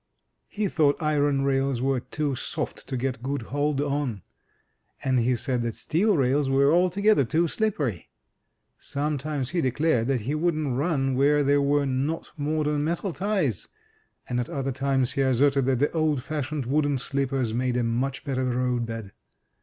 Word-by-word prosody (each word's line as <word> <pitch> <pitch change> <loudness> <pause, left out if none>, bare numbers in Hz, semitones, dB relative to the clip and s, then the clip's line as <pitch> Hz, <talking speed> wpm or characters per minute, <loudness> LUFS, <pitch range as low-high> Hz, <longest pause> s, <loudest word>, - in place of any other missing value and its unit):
He 210 -1 -2
thought 150 -6 +2
iron 145 -3 +1
rails 135 -2 +1
were 135 +1 +1
too 140 +3 -3
soft 125 - -4
to 130 - -3
get 130 -1 -2
good 135 0 -3
hold 145 0 +1
on, 140 -8 -2 0.8
and 130 -2 +2
he 125 +2 +2
said 125 +1 -1
that 115 -1 -3
steel 195 +4 +1
rails 135 +1 +2
were 140 +2 +4
altogether 185 +1 +3
too 160 +8 +1
slippery. 150 - -2 0.7
Sometimes 145 -1 -3
he 175 -1 0
declared 130 -2 +1
that 135 -4 0
he 130 +8 -2
wouldn't 155 -4 0
run 135 -2 0
where 145 +3 +3
there 140 +1 +3
were 140 0 +2
not 140 +5 -2
modem 150 -1 0
metal 170 +4 -2
ties, 185 - -1 0.6
and 125 -1 -1
at 120 - -3
other 135 -1 -2
times 135 -1 0
he 140 - -1
asserted 135 +1 +3
that 130 -1 +2
the 145 +4 +1
old 155 -5 0
fashioned 150 -2 -3
wooden 145 +2 +1
sleepers 135 -3 -1
made 125 +1 0
a 125 - +1
much 125 +4 -1
better 130 -3 -1
road 125 -1 0
bed. 115 -4 -6
140 Hz, 165 wpm, -26 LUFS, 130-150 Hz, 0.8 s, were